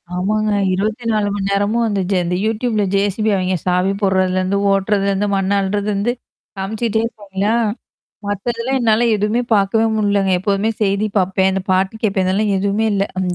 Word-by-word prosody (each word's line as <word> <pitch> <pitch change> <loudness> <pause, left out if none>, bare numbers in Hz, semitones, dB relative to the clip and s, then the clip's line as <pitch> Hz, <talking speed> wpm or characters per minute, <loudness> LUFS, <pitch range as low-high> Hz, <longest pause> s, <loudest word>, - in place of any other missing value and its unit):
ஆமாங்க. 215 +4 0 0.2
24 215 +2 -1
மணி 200 -1 -2
நேரமும் 205 +4 +1
அந்த 205 -3 -1
ஜ - - +3
இந்த 175 +1 -1
யூடியூப்ல 220 -1 0
ஜேசிபி 205 +2 +1
அவைங்க 185 0 0
சாவி 180 +1 +1
போடுறதுலேருந்து 185 0 +1
ஓட்டுறதுலேருந்து 200 0 +1
மண் 195 0 0
அள்றதுருந்து, 200 +2 -1 0.5
காமிச்சுட்டே 220 +3 -1
இருப்பாங்களா? 205 -2 -3 0.7
மத்ததெல்லாம் 230 +6 -2
என்னால 230 0 +3
எதுவுமே 210 +3 0
பாக்கவே 210 +2 +2
முடியலங்க. 200 -2 +1
எப்போதுமே 200 +3 0
செய்தி 200 +1 +1
பாப்பேன்.அந்த 190 0 +1
பாட்டு 190 +2 +1
கேட்பேன். 195 -3 +1
இதெல்லாம் 200 +2 +1
எதுவுமே 200 +3 0
இல்ல. 195 - +1 0.2
அந்த 180 -1 -1
200 Hz, 140 wpm, -18 LUFS, 190-215 Hz, 0.7 s, ஜ